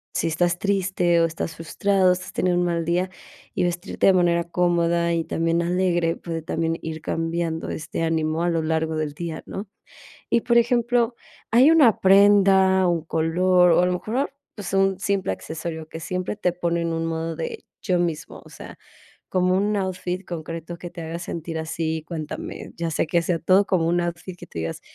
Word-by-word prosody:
si - - 0
estás 175 +2 +1
triste 185 -4 +1
o - - +4
estás 160 -1 -4
frustrado, 185 +2 +2
si - - -6
estás 185 - -10
teniendo 180 -1 +1
un - - +1
mal 170 -1 -1
día, 180 +2 0 0.5
y - - +1
vestirte 175 +3 -1
de 190 - +7
manera 170 -1 +3
cómoda, 170 -1 +1
y 165 -1 0
también 165 +1 0
alegre, 175 -1 +1
puede 165 -1 -5
también 165 0 -1
ir 160 -1 -6
cambiando 165 0 -2
este 155 +1 -4
ánimo 160 0 0
a 175 - +2
lo 165 -1 0
largo 160 0 0
del 150 -2 -2
día, 165 0 -6
¿no? 200 +1 -6 0.6
Y, 235 - +3
por 235 -1 +2
ejemplo, 235 0 +2 0.4
hay 260 +7 +6
una 280 -10 +5
prenda, 190 -1 +5
un 170 -2 0
color, 180 +3 +3
o - - +4
a - - +3
lo 180 - +1
mejor, 235 +10 -2 0.2
pues, 200 -3 -6
un 195 -1 +2
simple 195 - 0
accesorio, 160 - -6
que 160 - -7
siempre 185 +4 -3
te 180 -4 0
pone 170 -1 -1
en 165 0 -1
un 165 0 -2
modo 165 0 -3
de 165 - -6 0.2
yo 185 -4 +1
mismo, 165 -3 -3
o - - -14
sea, - - -11 0.5
como 185 0 +2
un 210 +2 +1
outfit 185 -1 -3
concreto, 165 0 -6
que 175 0 -8
te 175 -1 -8
haga 165 +1 -5
sentir 165 -1 -5
así. 160 0 -3
Cuéntame, 155 -3 -6
ya 170 -1 -2
sea 155 - 0
que 170 -1 +2
sea 170 -1 0
todo 190 +4 +4
como 175 -5 +1
un 175 +1 +2
outfit 175 +1 -5
que - - -11
tú - - -11
digas, 80 - -4
175 Hz, 195 wpm, -23 LUFS, 165-185 Hz, 0.6 s, de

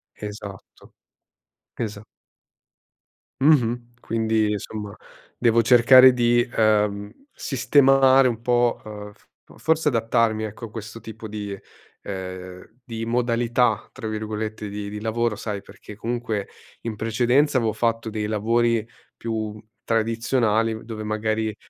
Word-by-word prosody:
Esatto. 105 -2 -10 0.8
Esa 105 -2 -5 1.4
Mh-mh. 120 -5 +2
Quindi 110 -1 0
insomma 105 0 -5 0.4
devo 115 -1 +4
cercare 130 +2 +8
di, 120 -1 +3
ehm, 105 -2 +1 0.2
sistemare 135 +1 +4
un 115 -2 -2
po', 120 0 +1
uhm, 105 -1 -8
f - - -29 0.3
forse 160 -1 +1
adattarmi 115 -3 +1
ecco 110 +2 -6
a - - -10
questo 110 0 -8
tipo 110 0 -9
di 105 -2 -5 0.4
ehm, 95 +2 -8
di 115 -1 -5
"modalità" 120 -1 +1
tra 110 - -6
virgolette 110 0 -4
di 100 0 -5
di 105 +1 -6
lavoro 115 +1 -1
sai 105 -2 -4
perché 105 - -13
comunque 115 -2 -3 0.3
in 115 -2 -4
precedenza 125 +6 +2
avevo 115 -3 +1
fatto 115 0 -1
dei 110 -1 -3
lavori 115 +1 +1 0.3
più 110 -2 -4 0.2
tradizionali 115 -1 +1
dove 110 -1 -6
magari, 110 0 -1
110 Hz, 115 wpm, -23 LUFS, 105-120 Hz, 1.4 s, cercare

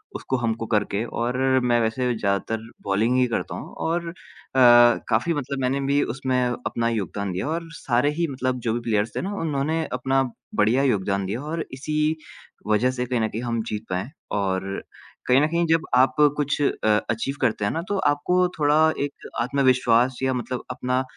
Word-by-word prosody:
उसको 130 - -2
हमको 115 -1 -2
करके 105 -1 0
और 120 +2 -2 0.3
मैं 120 -1 +3
वैसे 120 +2 0
ज़्यादातर 110 +2 -1 0.2
बॉलिंग 110 +6 +1
ही 125 - +4
करता 115 - -3
हूँ - - -8
और 170 +1 -1
अ, - - -8 1.0
काफ़ी 120 +9 +2
मतलब 140 -1 -3
मैंने 130 +2 0
भी 140 +1 +3
उसमें 130 -1 -1
अपना 120 -1 -2
योगदान 100 -2 -3
दिया 95 +10 -3
और 165 +1 -3
सारे 125 -1 +1
ही 170 - +2
मतलब 130 -1 -2
जो 110 - +2
भी 120 - -1
प्लेयर्स 105 +1 0
थे - - -1
ना 200 +2 -3
उन्होंने 155 +1 0
अपना 135 +1 +1 0.3
बढ़िया 115 +6 +3
योगदान 100 -5 +1
दिया 110 +7 -3
और 160 +1 -3
इसी 150 +3 -3 0.7
वजह 110 +4 +3
से 125 -1 -3
कहीं 125 -1 -1
न 110 - +2
कहीं 115 - -5
हम 115 -1 -1
जीत 105 0 -4
पाए 95 +7 -2 0.3
और 95 -2 0 0.6
कहीं 125 +2 +5
न 150 - +3
कहीं 170 +1 +1
जब 165 0 +2
आप 130 +1 +4 0.2
कुछ 145 0 0
अ, 140 - 0 0.2
अचीव 115 +5 -1
करते 110 -4 +1
हैं - - +1
ना, 165 - -2
तो 200 - 0
आपको 180 +3 +2
थोड़ा 150 0 +3 0.3
एक 145 - -6
आत्मविश्वास 130 -1 +2
या 130 0 +2
मतलब 125 0 -4
अपना 125 +1 -1
125 Hz, 185 wpm, -24 LUFS, 115-140 Hz, 1.0 s, कहीं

